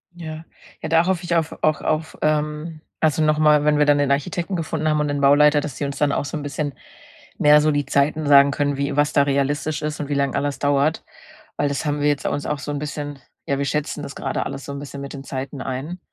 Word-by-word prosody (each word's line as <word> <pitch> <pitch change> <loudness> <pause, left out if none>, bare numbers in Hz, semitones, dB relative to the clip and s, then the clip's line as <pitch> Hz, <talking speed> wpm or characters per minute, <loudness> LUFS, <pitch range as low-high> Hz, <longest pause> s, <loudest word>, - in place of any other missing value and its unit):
Ja. 160 -2 -7 0.4
Ja, 160 - -4
da 165 +1 +4
hoffe 185 -1 0
ich 170 0 -1
auf 160 -1 -1
auch 155 -1 +2
auf, 155 +1 -2
ähm 155 +1 -1 0.2
also, 155 0 +2
noch 155 0 +3
mal, 150 -1 +5
wenn 150 0 +3
wir 150 - +4
dann 145 0 +4
den 140 -1 +1
Architekten 175 +6 -1
gefunden 155 -1 -2
haben 150 0 +2
und 150 - 0
den 145 0 -2
Bauleiter, 145 +1 +5
dass 145 -4 -6
die 145 - -2
uns 140 - -4
dann 145 -1 +2
auch - - -1
so 145 - -5
'n 150 - -4
bisschen 145 0 -3 0.6
mehr 150 0 +6
so 155 0 +2
die 145 -1 0
Zeiten 150 +2 +1
sagen 140 0 +7
können, 145 0 0
wie 140 +1 -2
was 145 0 +2
da 140 - +5
realistisch 145 +2 -1
ist 150 0 -3
und 145 - -5
wie 145 - 0
lang 140 -1 0
alles 140 0 -1
dauert. 145 +2 +1 0.5
Weil 145 - +1
das 140 +2 -3
haben 145 0 -1
wir 150 - +3
jetzt 145 -2 -1
uns 145 - -2
auch 150 -1 -2
so 145 - -5
'n 145 - -3
bisschen 145 -1 -5 0.3
ja, 140 - -1
wir 140 - -1
schätzen 150 +1 -2
das 140 - -7
grade 135 - -2
alles 135 0 -6
so 140 - -6
'n 140 - -5
bisschen 140 -1 -8
mit 140 - -7
den 140 -1 -8
Zeiten 135 0 -5
ein 140 +8 -5
145 Hz, 255 wpm, -22 LUFS, 140-155 Hz, 0.6 s, sagen